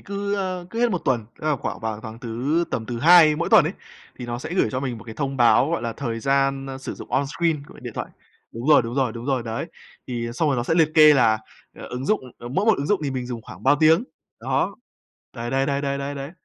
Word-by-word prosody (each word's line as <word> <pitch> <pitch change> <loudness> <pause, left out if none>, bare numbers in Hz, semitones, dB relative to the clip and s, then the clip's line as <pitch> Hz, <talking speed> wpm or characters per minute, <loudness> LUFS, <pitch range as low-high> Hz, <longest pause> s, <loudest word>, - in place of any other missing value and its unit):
cứ, 200 0 -3
ơ, 185 -3 -3
cứ 230 - -3
hết 240 -1 +3
1 185 - 0
tuần, 120 -5 0
tức - - -5
là 150 -2 +2
khoảng - - -5
vào 110 -1 -4
tháng 110 0 -9
thứ 125 +8 -1
tầm 110 - -3
thứ 120 0 -4
Hai 160 +1 +7
mỗi 170 +2 -1
tuần - - +7
ấy, - - -2 0.5
thì 125 - -6
nó 120 0 -4
sẽ 155 +6 -6
gửi - - +2
cho 130 - -2
mình 125 -4 -3
một 110 - -13
cái 110 - -9
thông 140 0 -3
báo, 130 +4 +4
gọi 170 - -1
là, 115 -1 -2
thời 115 -3 -4
gian, 135 +1 +1
ơ, 135 0 -6
sử 135 - -6
dụng - - -11
on 140 - +2
screen 160 0 -1
của - - -15
điện - - -7
thoại. - - -4 0.4
Đúng 115 +3 -6
rồi, 150 - +7
đúng 115 +1 -5
rồi, 130 -4 +1
đúng 115 +1 -8
rồi, 135 -3 0
đấy. 115 -1 -4 0.4
Thì 120 -2 -3
xong 155 +5 +1
rồi 140 - +1
nó 120 - 0
sẽ 130 - 0
liệt 160 -2 +4
kê 155 -1 +8
là, 115 -5 +4 0.4
ờ, - - -10
ứng 125 +2 -5
dụng 215 - +2 0.2
ờ, 120 - -8
mỗi 190 - -1
một 220 - +5
ứng 140 - -2
dụng 205 +4 +1
thì 145 - -1
mình 130 -2 -4
dùng 120 -2 -6
khoảng - - -12
bao 145 - +4
tiếng. 160 +7 +5 0.4
Đó. - - -1 0.6
Đấy, 120 0 -5
đấy, 135 +1 +1
đấy, 140 0 0
đấy, 140 -1 -1
đấy, 140 +1 -4
đấy. 140 +1 -6
135 Hz, 275 wpm, -23 LUFS, 120-155 Hz, 0.6 s, kê